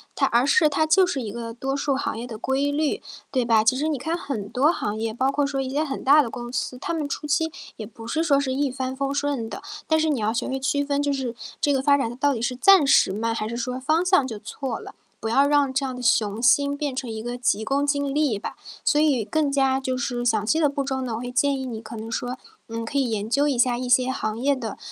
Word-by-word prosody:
它 275 Hz, -, +2 dB
而 240 Hz, -1 st, +3 dB
是 310 Hz, +3 st, +4 dB
它 300 Hz, +1 st, +1 dB
就 360 Hz, +4 st, +4 dB
是 280 Hz, -7 st, -2 dB
一 215 Hz, -4 st, -5 dB
个 230 Hz, +1 st, -6 dB
多 270 Hz, +3 st, -3 dB
数 280 Hz, -1 st, 0 dB
行 265 Hz, -, -2 dB
业 240 Hz, -, -6 dB
的 225 Hz, -3 st, -7 dB
规 275 Hz, +5 st, 0 dB
律， 300 Hz, 0 st, 0 dB, 0.3 s
对 255 Hz, -3 st, +1 dB
吧？ 225 Hz, -2 st, +4 dB
其 255 Hz, +4 st, +3 dB
实 300 Hz, +3 st, 0 dB
你 310 Hz, -2 st, 0 dB
看 320 Hz, +6 st, -2 dB
很 220 Hz, -, -5 dB
多 270 Hz, +7 st, +3 dB
行 215 Hz, -10 st, -2 dB
业， 225 Hz, 0 st, -2 dB
包 260 Hz, +4 st, +1 dB
括 285 Hz, 0 st, +1 dB
说 275 Hz, -1 st, -2 dB
一 265 Hz, -, -3 dB
些 285 Hz, +3 st, 0 dB
很 285 Hz, -3 st, -3 dB
大 290 Hz, +3 st, +7 dB
的 250 Hz, -, -3 dB
公 240 Hz, +1 st, -7 dB
司， 250 Hz, 0 st, -3 dB
他 285 Hz, -, -4 dB
们 310 Hz, -3 st, -2 dB
初 285 Hz, -, -5 dB
期 320 Hz, +2 st, +1 dB, 0.3 s
也 220 Hz, -, -6 dB
不 225 Hz, +1 st, -12 dB
是 310 Hz, +8 st, -1 dB
说 310 Hz, -4 st, +3 dB
是 275 Hz, -2 st, 0 dB
一 280 Hz, +1 st, 0 dB
帆 260 Hz, 0 st, -3 dB
风 275 Hz, +1 st, -2 dB
顺 280 Hz, -5 st, -1 dB
的， -, -, -7 dB, 0.3 s
但 315 Hz, -, +3 dB
是 315 Hz, 0 st, +1 dB
你 285 Hz, -5 st, 0 dB
要 215 Hz, +1 st, 0 dB
学 240 Hz, +1 st, -2 dB
会 265 Hz, 0 st, -2 dB
区 285 Hz, +2 st, 0 dB
分， 285 Hz, 0 st, 0 dB
就 285 Hz, 0 st, 0 dB
是 260 Hz, -4 st, -3 dB, 0.3 s
这 290 Hz, -, +2 dB
个 270 Hz, -2 st, +2 dB
发 280 Hz, +1 st, +4 dB
展 270 Hz, -5 st, -1 dB
它 240 Hz, -, -7 dB
到 285 Hz, +2 st, +2 dB
底 230 Hz, -, -4 dB
是 240 Hz, +2 st, 0 dB
暂 370 Hz, +5 st, +6 dB
时 230 Hz, -7 st, +4 dB
慢？ 225 Hz, +3 st, -1 dB
还 215 Hz, -1 st, -3 dB
是 235 Hz, -, -5 dB
说 250 Hz, +2 st, -3 dB
方 310 Hz, +6 st, +1 dB
向 365 Hz, -8 st, +3 dB
就 225 Hz, -4 st, -6 dB
错 260 Hz, +1 st, -5 dB
了， -, -, -10 dB, 0.3 s
不 225 Hz, -, -2 dB
要 275 Hz, +5 st, +4 dB
让 285 Hz, -2 st, +2 dB
这 270 Hz, +1 st, 0 dB
样 260 Hz, -1 st, -4 dB
的 250 Hz, -, -7 dB
雄 225 Hz, -2 st, +1 dB
心 280 Hz, +4 st, +4 dB
变 285 Hz, -1 st, -3 dB
成 255 Hz, -1 st, -4 dB
一 220 Hz, -1 st, -5 dB
个 240 Hz, +1 st, -4 dB
急 225 Hz, -3 st, +1 dB
功 280 Hz, +5 st, 0 dB
近 285 Hz, -1 st, 0 dB
利 290 Hz, -7 st, +1 dB
吧。 200 Hz, -, -7 dB, 0.3 s
所 295 Hz, -, +3 dB
以 290 Hz, -7 st, +3 dB
更 305 Hz, +6 st, 0 dB
加 270 Hz, -1 st, +2 dB
就 260 Hz, -1 st, -2 dB
是 245 Hz, -1 st, -2 dB
详 220 Hz, -3 st, +2 dB
细 310 Hz, +9 st, +2 dB
的 310 Hz, -, +4 dB
步 280 Hz, 0 st, -2 dB
骤 265 Hz, -1 st, -2 dB
呢， 255 Hz, -3 st, -3 dB
我 -, -, -4 dB
会 245 Hz, 0 st, -5 dB
建 275 Hz, +2 st, +2 dB
议 265 Hz, -, -4 dB
你 235 Hz, -4 st, -5 dB
可 225 Hz, +1 st, -9 dB
能 225 Hz, +1 st, -7 dB
说， 245 Hz, +3 st, -3 dB, 0.3 s
嗯， 230 Hz, 0 st, -4 dB
可 250 Hz, +5 st, -3 dB
以 265 Hz, -3 st, +1 dB
研 215 Hz, -1 st, -2 dB
究 280 Hz, +4 st, +2 dB
一 275 Hz, -4 st, 0 dB
下 245 Hz, 0 st, +3 dB
一 250 Hz, +1 st, -4 dB
些 255 Hz, +1 st, +3 dB
行 215 Hz, -4 st, -3 dB
业 275 Hz, +4 st, +2 dB
的 230 Hz, -6 st, -5 dB
265 Hz, 305 characters per minute, -24 LUFS, 235-285 Hz, 0.3 s, 大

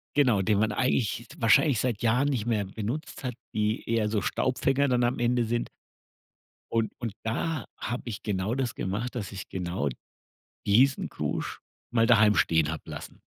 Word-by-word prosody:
Genau, 125 Hz, -9 st, +4 dB
den 105 Hz, +2 st, +2 dB
man 110 Hz, 0 st, +2 dB
eigentlich 120 Hz, -1 st, 0 dB
wahrscheinlich 115 Hz, +3 st, +4 dB
seit 120 Hz, -4 st, -1 dB
Jahren 125 Hz, +5 st, +3 dB
nicht 120 Hz, -7 st, -1 dB
mehr 110 Hz, -4 st, +1 dB
benutzt 110 Hz, +11 st, -5 dB
hat, 125 Hz, -3 st, -3 dB, 0.2 s
die 105 Hz, +1 st, -1 dB
eher 115 Hz, -2 st, +1 dB
so 105 Hz, -1 st, 0 dB
Staubfänger 135 Hz, +5 st, +1 dB
dann 125 Hz, -2 st, +2 dB
am 120 Hz, +2 st, +1 dB
Ende 120 Hz, 0 st, +2 dB
sind. 120 Hz, +1 st, -1 dB, 1.0 s
Und 115 Hz, -1 st, +1 dB
und 115 Hz, -4 st, -3 dB
da 140 Hz, +7 st, -1 dB
habe 120 Hz, +1 st, -4 dB
ich 110 Hz, -4 st, -5 dB
genau 100 Hz, +1 st, -1 dB
das 130 Hz, -4 st, -2 dB
gemacht, 105 Hz, +7 st, -3 dB
dass 105 Hz, -6 st, -4 dB
ich 100 Hz, -2 st, -7 dB
genau 85 Hz, -6 st, -2 dB, 0.8 s
diesen 130 Hz, +7 st, +4 dB
Krusch -, -, -3 dB, 0.3 s
mal 115 Hz, -1 st, +3 dB
daheim 110 Hz, -2 st, +6 dB
stehen 80 Hz, -2 st, +3 dB
habe 80 Hz, -, -5 dB
lassen. -, -, -8 dB
115 Hz, 165 wpm, -28 LUFS, 105-125 Hz, 1.0 s, daheim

